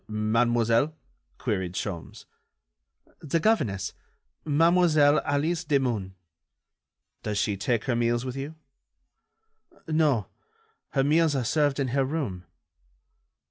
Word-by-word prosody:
"Mademoiselle?" 115 Hz, +5 st, +1 dB, 0.4 s
queried 95 Hz, -7 st, -2 dB
Sholmes. 90 Hz, -3 st, -6 dB, 0.9 s
"The 160 Hz, +2 st, -1 dB
governess, 120 Hz, -, 0 dB, 0.5 s
Mademoiselle 155 Hz, -1 st, +4 dB
Alice 160 Hz, +4 st, 0 dB
Demun." 125 Hz, -, 0 dB, 1.1 s
"Does 105 Hz, -1 st, -3 dB
she 100 Hz, 0 st, 0 dB
take 110 Hz, +3 st, -1 dB
her 125 Hz, -, 0 dB
meals 120 Hz, +1 st, 0 dB
with 130 Hz, -1 st, -4 dB
you?" 140 Hz, +4 st, -6 dB, 1.3 s
"No. 155 Hz, -9 st, +2 dB, 0.7 s
Her 135 Hz, -, +2 dB
meals 155 Hz, +1 st, +3 dB
are 130 Hz, -3 st, -1 dB
served 145 Hz, +1 st, +1 dB
in 135 Hz, -2 st, 0 dB
her 135 Hz, +2 st, +1 dB
room." 130 Hz, -, -3 dB
135 Hz, 100 wpm, -26 LUFS, 110-150 Hz, 1.3 s, Mademoiselle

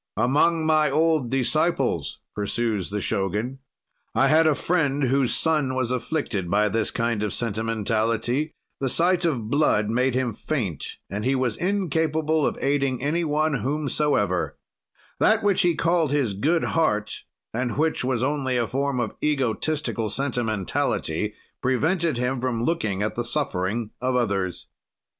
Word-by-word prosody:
"Among 160 Hz, +5 st, +2 dB
my 155 Hz, -1 st, +3 dB
old 155 Hz, -3 st, +2 dB
disciples," 135 Hz, -, 0 dB, 0.2 s
pursues 105 Hz, -1 st, -1 dB
the 105 Hz, 0 st, -3 dB
Shogun, 105 Hz, +9 st, -2 dB, 0.6 s
"I 135 Hz, -, +4 dB
had 160 Hz, +1 st, +5 dB
a 155 Hz, -, +3 dB
friend 145 Hz, -3 st, 0 dB
whose 135 Hz, -1 st, +2 dB
son 150 Hz, -5 st, +1 dB
was 130 Hz, -2 st, -1 dB
afflicted 125 Hz, -, -2 dB
by 105 Hz, +2 st, +3 dB
this 110 Hz, +2 st, +1 dB
kind 115 Hz, -2 st, -1 dB
of 105 Hz, -1 st, -1 dB
sentimentality, 115 Hz, +4 st, -1 dB, 0.2 s
the 135 Hz, -, 0 dB
sight 175 Hz, +5 st, +2 dB
of 120 Hz, -9 st, -1 dB
blood 110 Hz, -8 st, +2 dB
made 125 Hz, +2 st, +1 dB
him 130 Hz, -3 st, 0 dB
faint 105 Hz, -, -3 dB
and 100 Hz, +2 st, -4 dB
he 135 Hz, +3 st, +2 dB
was 125 Hz, -4 st, 0 dB
incapable 160 Hz, -5 st, 0 dB
of -, -, -3 dB
aiding 140 Hz, -3 st, +1 dB
any 165 Hz, +4 st, +1 dB
one 155 Hz, -2 st, +1 dB
whomsoever; 140 Hz, -8 st, 0 dB, 0.6 s
that -, -, +3 dB
which 205 Hz, -2 st, +3 dB
he 175 Hz, -2 st, +2 dB
called 165 Hz, -3 st, +1 dB
his 140 Hz, -8 st, +1 dB
good 155 Hz, -, +1 dB
heart, 105 Hz, -11 st, 0 dB, 0.3 s
and 120 Hz, 0 st, -2 dB
which 160 Hz, -2 st, +1 dB
was 125 Hz, -1 st, 0 dB
only 130 Hz, -2 st, 0 dB
a 120 Hz, -, +1 dB
form 135 Hz, +1 st, -1 dB
of -, -, -2 dB
egotistical 135 Hz, -3 st, 0 dB
sentimentality, 110 Hz, -, -1 dB, 0.3 s
prevented 160 Hz, +4 st, +1 dB
him 125 Hz, +1 st, -1 dB
from 120 Hz, -3 st, -1 dB
looking 110 Hz, -, 0 dB
at 110 Hz, -, -1 dB
the 120 Hz, -, -2 dB
suffering 115 Hz, -4 st, -1 dB
of 130 Hz, 0 st, 0 dB
others. 100 Hz, -7 st, -1 dB
130 Hz, 145 wpm, -24 LUFS, 115-155 Hz, 0.6 s, had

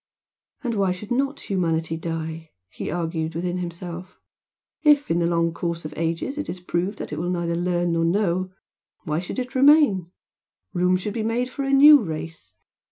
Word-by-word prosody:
"And 240 Hz, -2 st, -1 dB
why 195 Hz, -3 st, +1 dB
should 200 Hz, +5 st, -10 dB
not 275 Hz, +3 st, 0 dB
humanity 165 Hz, -4 st, -1 dB
die?" 160 Hz, 0 st, -5 dB, 0.2 s
he -, -, -6 dB
argued 165 Hz, -2 st, -2 dB
within 175 Hz, +1 st, -2 dB
himself 175 Hz, +1 st, -7 dB, 0.6 s
"If, 295 Hz, -, +4 dB
in 170 Hz, -, +2 dB
the 170 Hz, -, +2 dB
long 170 Hz, -1 st, +1 dB
course 170 Hz, -1 st, -3 dB
of 155 Hz, -, -6 dB
ages, 165 Hz, -, -2 dB
it 295 Hz, -, -4 dB
is 180 Hz, -, -4 dB
proved 180 Hz, +3 st, -2 dB
that -, -, -6 dB
it 150 Hz, -, -3 dB
will 175 Hz, +2 st, -2 dB
neither 170 Hz, -1 st, -1 dB
learn 175 Hz, 0 st, 0 dB
nor 165 Hz, 0 st, +1 dB
know, 185 Hz, +1 st, +1 dB, 0.5 s
why 155 Hz, -2 st, -1 dB
should 180 Hz, -, -6 dB
it 250 Hz, 0 st, -4 dB
remain? 265 Hz, -, +5 dB, 0.6 s
Room 180 Hz, 0 st, +2 dB
should 200 Hz, +3 st, -4 dB
be 225 Hz, -, -2 dB
made 235 Hz, +3 st, -1 dB
for -, -, -5 dB
a 275 Hz, 0 st, -1 dB
new 290 Hz, +2 st, +8 dB
race! 160 Hz, -, -7 dB
175 Hz, 180 wpm, -24 LUFS, 165-215 Hz, 0.6 s, new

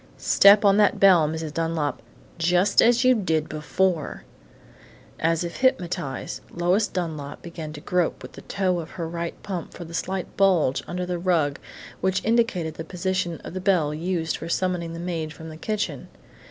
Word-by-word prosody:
"Step 200 Hz, +1 st, +6 dB
on 200 Hz, 0 st, +5 dB
that 210 Hz, -1 st, +3 dB
bell, 180 Hz, -6 st, +6 dB
Mrs. 160 Hz, -1 st, -4 dB
Dunlap 165 Hz, -4 st, -1 dB, 0.4 s
just 180 Hz, +4 st, +4 dB
as 240 Hz, +2 st, +4 dB
you 255 Hz, -, +7 dB
did 165 Hz, -8 st, 0 dB
before!" 160 Hz, +2 st, -1 dB, 1.0 s
As 165 Hz, +1 st, +1 dB
if 170 Hz, -1 st, -5 dB
hypnotized, 175 Hz, -, -1 dB
Lois 180 Hz, +5 st, +1 dB
Dunlap 155 Hz, -6 st, -5 dB
began 165 Hz, -3 st, -7 dB
to 145 Hz, -, -9 dB
grope 180 Hz, 0 st, -1 dB
with -, -, -9 dB
the -, -, -11 dB
toe 185 Hz, -3 st, -1 dB
of 160 Hz, -1 st, -7 dB
her 165 Hz, -2 st, -3 dB
right 170 Hz, 0 st, -4 dB
pump 185 Hz, -5 st, -5 dB
for 175 Hz, -, -8 dB
the 165 Hz, -, -11 dB
slight 185 Hz, +2 st, -3 dB
bulge 180 Hz, -9 st, +3 dB
under 180 Hz, 0 st, -3 dB
the 180 Hz, -1 st, -3 dB
rug 165 Hz, -6 st, +1 dB, 0.4 s
which 190 Hz, +1 st, 0 dB
indicated 220 Hz, -8 st, +1 dB
the 165 Hz, -, -6 dB
position 180 Hz, 0 st, -2 dB
of -, -, -8 dB
the 185 Hz, -, -4 dB
bell 175 Hz, -6 st, +2 dB
used 165 Hz, 0 st, -2 dB
for 165 Hz, -, -7 dB
summoning 175 Hz, -2 st, -1 dB
the 165 Hz, -, -6 dB
maid 165 Hz, -3 st, -3 dB
from 160 Hz, 0 st, -10 dB
the 155 Hz, -, -9 dB
kitchen. 210 Hz, +5 st, -3 dB
175 Hz, 175 wpm, -24 LUFS, 160-190 Hz, 1.0 s, you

